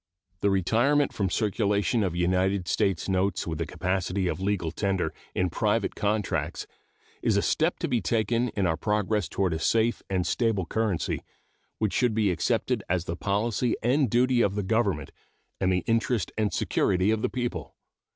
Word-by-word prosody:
The 100 Hz, -, +2 dB
retirement 120 Hz, +10 st, +2 dB
from 100 Hz, -3 st, -1 dB
circulation 105 Hz, +2 st, +1 dB
of 90 Hz, -3 st, -1 dB
United 90 Hz, +1 st, +1 dB
States 95 Hz, -2 st, 0 dB
notes 95 Hz, 0 st, 0 dB
with 80 Hz, -2 st, -4 dB
the 85 Hz, -, -2 dB
capacity 95 Hz, +2 st, -1 dB
of 90 Hz, -, -2 dB
legal 95 Hz, -4 st, -1 dB
tender 95 Hz, +1 st, -1 dB, 0.2 s
in 90 Hz, -1 st, +1 dB
private -, -, 0 dB
contracts 105 Hz, -1 st, -1 dB, 0.6 s
is -, -, +2 dB
a -, -, +3 dB
step -, -, +1 dB
to -, -, -2 dB
be 120 Hz, -3 st, 0 dB
taken 115 Hz, +2 st, +1 dB
in 100 Hz, -, +2 dB
our 80 Hz, -2 st, +1 dB
progress 105 Hz, +1 st, 0 dB
toward 95 Hz, -4 st, 0 dB
a 80 Hz, -, -2 dB
safe 115 Hz, +5 st, +1 dB
and 95 Hz, -2 st, 0 dB
stable 110 Hz, -1 st, 0 dB
currency 105 Hz, -3 st, -1 dB, 0.6 s
which 105 Hz, -4 st, -1 dB
should 120 Hz, -1 st, +2 dB
be 105 Hz, -4 st, +2 dB
accepted 85 Hz, -, 0 dB
as 90 Hz, -1 st, 0 dB
the 85 Hz, -, -3 dB
policy 105 Hz, +5 st, 0 dB
and 130 Hz, +2 st, +2 dB
duty 125 Hz, +2 st, +3 dB
of 100 Hz, -3 st, +1 dB
the 105 Hz, -, -1 dB
Government 95 Hz, -, 0 dB, 0.5 s
and 95 Hz, -1 st, +2 dB
the 90 Hz, -1 st, +1 dB
interest 115 Hz, -1 st, 0 dB
and 105 Hz, -2 st, 0 dB
security 95 Hz, +3 st, +1 dB
of 110 Hz, -1 st, 0 dB
the -, -, 0 dB
people. 120 Hz, -1 st, -4 dB
100 Hz, 170 wpm, -27 LUFS, 90-115 Hz, 0.6 s, a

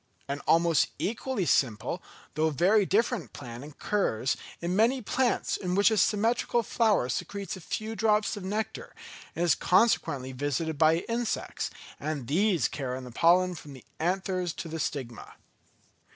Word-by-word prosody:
An 140 Hz, +1 st, -3 dB
almost 165 Hz, -1 st, +4 dB
equally 230 Hz, -1 st, -2 dB
simple, 115 Hz, -9 st, +1 dB, 0.3 s
though 155 Hz, +2 st, +2 dB
very 190 Hz, +7 st, +3 dB
different 210 Hz, -, 0 dB
plan 120 Hz, -3 st, -8 dB
occurs 145 Hz, -, -1 dB, 0.2 s
in 175 Hz, +2 st, -2 dB
many 235 Hz, +6 st, +3 dB
plants 250 Hz, +2 st, 0 dB
in 180 Hz, -2 st, -2 dB
which 200 Hz, +3 st, +5 dB
a 220 Hz, -, +1 dB
symmetrical 230 Hz, +3 st, +2 dB
flower 215 Hz, -, +2 dB
secretes 200 Hz, +11 st, -4 dB
a 185 Hz, -, -10 dB
few 220 Hz, +6 st, -4 dB
drops 215 Hz, -1 st, +2 dB
of 205 Hz, -, -7 dB
nectar, 210 Hz, +3 st, -4 dB, 0.4 s
and 170 Hz, -, 0 dB
is 170 Hz, -, +5 dB
consequently 140 Hz, -, +2 dB
visited 145 Hz, +3 st, -2 dB
by 160 Hz, +2 st, +4 dB
insects; 235 Hz, 0 st, -2 dB, 0.3 s
and 150 Hz, -5 st, -3 dB
these 175 Hz, -, +2 dB
carry 130 Hz, -2 st, -4 dB
the 125 Hz, -1 st, -9 dB
pollen 180 Hz, +7 st, +4 dB
from 150 Hz, -4 st, -10 dB
the 130 Hz, -, -13 dB
anthers 180 Hz, 0 st, -1 dB
to 170 Hz, -, -6 dB
the 165 Hz, 0 st, -5 dB
stigma. 130 Hz, -6 st, -5 dB
175 Hz, 150 wpm, -28 LUFS, 145-210 Hz, 0.4 s, which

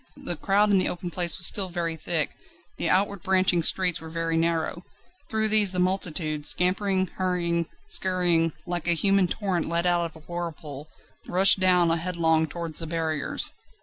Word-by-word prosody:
The -, -, -1 dB
crowd 205 Hz, +1 st, +1 dB
in 195 Hz, -, +4 dB
the -, -, 0 dB
open 175 Hz, 0 st, -6 dB
place 175 Hz, -2 st, +1 dB
was 175 Hz, -, +5 dB
still 190 Hz, 0 st, +4 dB
very 170 Hz, -2 st, -3 dB
thick, 160 Hz, -1 st, -2 dB, 0.5 s
the -, -, -2 dB
outward 200 Hz, 0 st, 0 dB
branching 185 Hz, -3 st, +2 dB
streets 180 Hz, +1 st, +2 dB
were 160 Hz, -, -9 dB
very 165 Hz, 0 st, -3 dB
narrow: 165 Hz, 0 st, -1 dB, 0.5 s
through 220 Hz, 0 st, -1 dB
these 210 Hz, -3 st, +4 dB
the -, -, -3 dB
multitude, 160 Hz, -5 st, -1 dB
scampering, 190 Hz, +1 st, +2 dB
hurrying, 175 Hz, -2 st, -2 dB, 0.2 s
scurrying, 180 Hz, -, +1 dB
like 175 Hz, -2 st, -4 dB
a 175 Hz, -, +4 dB
human 195 Hz, +2 st, +2 dB
torrent 185 Hz, -3 st, -2 dB
let 170 Hz, +1 st, -1 dB
out 175 Hz, -1 st, +1 dB
of 165 Hz, -, -9 dB
a 160 Hz, -1 st, -16 dB
whirlpool, 155 Hz, -4 st, -7 dB, 0.4 s
rushed 190 Hz, +2 st, +6 dB
down 180 Hz, -2 st, +3 dB
headlong 165 Hz, -1 st, 0 dB
towards 165 Hz, 0 st, -5 dB
the 165 Hz, -, -4 dB
barriers. 160 Hz, -2 st, -2 dB
175 Hz, 170 wpm, -25 LUFS, 165-185 Hz, 0.5 s, rushed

